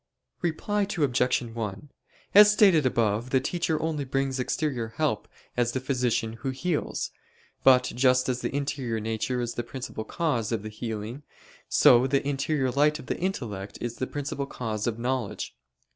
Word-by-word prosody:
Reply 200 Hz, +4 st, 0 dB
Obj. 125 Hz, -4 st, +2 dB
1: 115 Hz, +1 st, -5 dB, 0.4 s
As 210 Hz, +1 st, +9 dB
stated 190 Hz, -9 st, +5 dB
above, 115 Hz, 0 st, 0 dB
the 130 Hz, -, +3 dB
teacher 160 Hz, +3 st, -1 dB
only 160 Hz, -3 st, -1 dB
brings 135 Hz, 0 st, -1 dB
exterior 130 Hz, -3 st, -1 dB
help 150 Hz, -9 st, 0 dB, 0.3 s
as 120 Hz, -1 st, +1 dB
the 130 Hz, -, 0 dB
physician 125 Hz, -4 st, 0 dB
who 135 Hz, -, -2 dB
heals: 150 Hz, +5 st, -2 dB, 0.5 s
but 130 Hz, -1 st, +7 dB
just 125 Hz, +1 st, +2 dB
as 125 Hz, -1 st, -1 dB
the -, -, -1 dB
interior 135 Hz, -5 st, -2 dB
nature 115 Hz, +3 st, -2 dB
is 120 Hz, -1 st, -2 dB
the -, -, -2 dB
principal 120 Hz, -2 st, -6 dB
cause 120 Hz, -4 st, -1 dB
of 110 Hz, -3 st, -1 dB
the 110 Hz, -, -5 dB
healing, 110 Hz, +3 st, -5 dB, 0.5 s
so 125 Hz, +2 st, +6 dB
the 140 Hz, +1 st, +1 dB
interior 140 Hz, -1 st, 0 dB
light 150 Hz, +3 st, +3 dB
of 150 Hz, -, -11 dB
the -, -, -3 dB
intellect 110 Hz, -, -3 dB
is 120 Hz, -1 st, -4 dB
the 130 Hz, -, -2 dB
principal 140 Hz, -1 st, -4 dB
cause 110 Hz, -5 st, -3 dB
of 115 Hz, -1 st, -1 dB
knowledge. 125 Hz, -2 st, -3 dB
130 Hz, 160 wpm, -27 LUFS, 115-145 Hz, 0.5 s, As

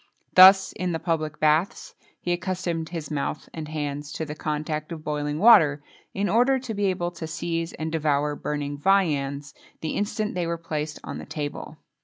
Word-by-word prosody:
Thus, 190 Hz, +1 st, +8 dB
in 180 Hz, -1 st, -3 dB
the -, -, 0 dB
public 155 Hz, -2 st, -2 dB
baths, 155 Hz, +4 st, +1 dB, 0.3 s
he 175 Hz, -, -3 dB
accustomed 175 Hz, -2 st, -2 dB
his 160 Hz, -4 st, -6 dB
mouth 150 Hz, +1 st, -3 dB
and 160 Hz, -2 st, -6 dB
hands 145 Hz, -1 st, -4 dB
to 160 Hz, -, -3 dB
the 150 Hz, -, -6 dB
contact 155 Hz, +1 st, -3 dB
of 160 Hz, -2 st, -6 dB
boiling 150 Hz, -1 st, -2 dB
water, 155 Hz, -9 st, +6 dB, 0.3 s
in 200 Hz, +1 st, -1 dB
order 250 Hz, +5 st, +3 dB
to 250 Hz, -3 st, -5 dB
be 205 Hz, -1 st, -1 dB
able 175 Hz, -2 st, -1 dB
to 170 Hz, -2 st, -7 dB
seize 165 Hz, +1 st, -3 dB
and 160 Hz, 0 st, -4 dB
devour 150 Hz, -2 st, 0 dB
burning 145 Hz, -1 st, -4 dB
viands, 145 Hz, -6 st, +1 dB, 0.3 s
the 160 Hz, -, -2 dB
instant 210 Hz, +1 st, -2 dB
they 175 Hz, -2 st, -2 dB
were 170 Hz, 0 st, -2 dB
placed 155 Hz, -2 st, -4 dB
on -, -, -6 dB
the -, -, -9 dB
table. 150 Hz, +1 st, -5 dB
160 Hz, 180 wpm, -25 LUFS, 150-180 Hz, 0.3 s, Thus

